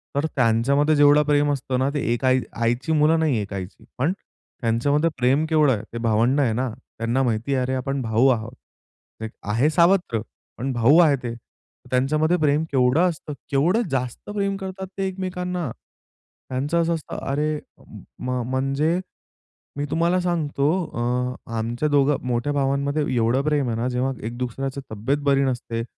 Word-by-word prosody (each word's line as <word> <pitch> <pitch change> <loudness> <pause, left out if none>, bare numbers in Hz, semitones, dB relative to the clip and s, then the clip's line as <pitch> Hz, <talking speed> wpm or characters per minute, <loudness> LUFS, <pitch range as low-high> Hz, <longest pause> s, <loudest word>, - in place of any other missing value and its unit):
तर 145 - +1
त्यांच्यामध्ये 135 +5 +3
जेवढं 145 +1 +6
प्रेम 145 0 +2
असतं 130 -1 -2
ना, 135 +1 +2
ते 145 - -1
एक 120 +2 -2
आई 130 0 +4
आईची 120 +5 0
मुलं 155 +2 +4
नाही 155 -7 +2
एक 100 0 -6
आईची. 95 0 -7
पण 140 +7 +1 0.5
त्यांच्यामध्ये 140 +7 +2
प्रेम 135 +5 +2
केवढं 155 -3 +4
आहे. 105 - -3
ते - - -4
भावंड 115 +4 +2
आहे 120 -5 +2
ना, 130 +2 -1 0.3
त्यांना 115 +4 0
माहिती 120 +3 -1
आहे. 130 - +1
अरे, 130 +1 -2
आपण 135 +1 -2
भाऊ 115 +3 +2
आहोत. 115 0 -1 0.7
एक 110 - -5 0.2
आहे 125 +8 +3
सावत्र, 170 - +3 0.4
पण 135 +2 -2
भाऊ 120 +6 +5
आहे 155 -5 +6
ते. 120 - -3 0.6
त्यांच्यामध्ये 155 +7 +2
प्रेम 150 0 +2
केवढं 135 +7 +3
असतं. 155 -2 -6 0.2
केवढं 170 +12 +3
जास्त 125 - -3
प्रेम 200 -1 0
करतात 190 0 -6
ते 195 -1 0
एकमेकांना. 180 -3 -3 0.8
त्यांचं 145 +6 0
असं 170 0 +1
असतं 155 - -7
अरे 150 +2 0 0.6
म 125 0 -2
म्हणजे, 140 +6 +1 0.8
मी 145 - -1
तुम्हाला 170 +2 +2
सांगतो 155 -5 0 0.3
अ, 125 +1 -1 0.2
आमच्या 120 +7 -1
दोघं 145 -1 +3
मोठ्या 125 +4 0
भावांमध्ये 140 +2 0
एवढं 120 +3 +2
प्रेम 145 -4 +1
आहे 115 - -2
ना, 120 +2 -1
जेव्हा 125 +2 0 0.2
एक 120 +1 -6
दुसऱ्याची 135 +2 -4
तब्येत 110 +7 -1
बरी 140 -1 +3
नसते. 120 -3 -2
135 Hz, 165 wpm, -23 LUFS, 125-155 Hz, 0.8 s, जेवढं